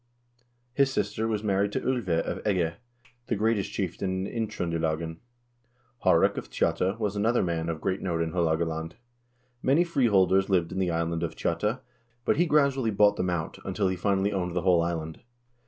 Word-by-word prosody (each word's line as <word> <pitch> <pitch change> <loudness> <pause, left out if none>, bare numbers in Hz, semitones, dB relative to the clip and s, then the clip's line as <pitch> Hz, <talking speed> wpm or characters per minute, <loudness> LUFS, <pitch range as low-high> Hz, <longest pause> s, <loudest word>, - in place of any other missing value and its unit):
His 135 0 +3
sister 110 -3 -1
was 110 -2 -1
married 100 0 +1
to - - 0
01ve 100 -11 0
of - - -4
Egge, 90 -6 +1 0.5
the - - 0
greatest 110 -1 0
chieftain 95 0 -2
in 115 +2 -2
Indtr0ndelagen. 80 -5 -2 0.9
Haarek - - +4
of - - -11
Tjotta 95 +4 0
was 105 -2 -1
another 110 +4 +2
man 85 -2 -1
of 80 -2 -3
great 95 +3 -2
note 85 -3 -1
in 80 - -3
Haalogaland. 80 -1 -1 0.7
Many 145 +6 +4
free 145 -8 +1
holders 95 -2 +3
lived 90 -4 +2
in 95 - -3
the 95 -2 +1
island 85 0 -1
of 85 - -3
Tjotta, 105 +8 -1 0.4
but - - +2
he 175 +2 +3
gradually 140 -5 +3
bought 105 0 +4
them 90 - -1
out, 85 -3 -3
until 95 0 0
he 95 - -1
finally 100 +2 +1
owned 90 -2 -2
the 90 - 0
whole 90 -3 +4
island. 80 -2 -3
95 Hz, 175 wpm, -27 LUFS, 85-105 Hz, 0.9 s, Haarek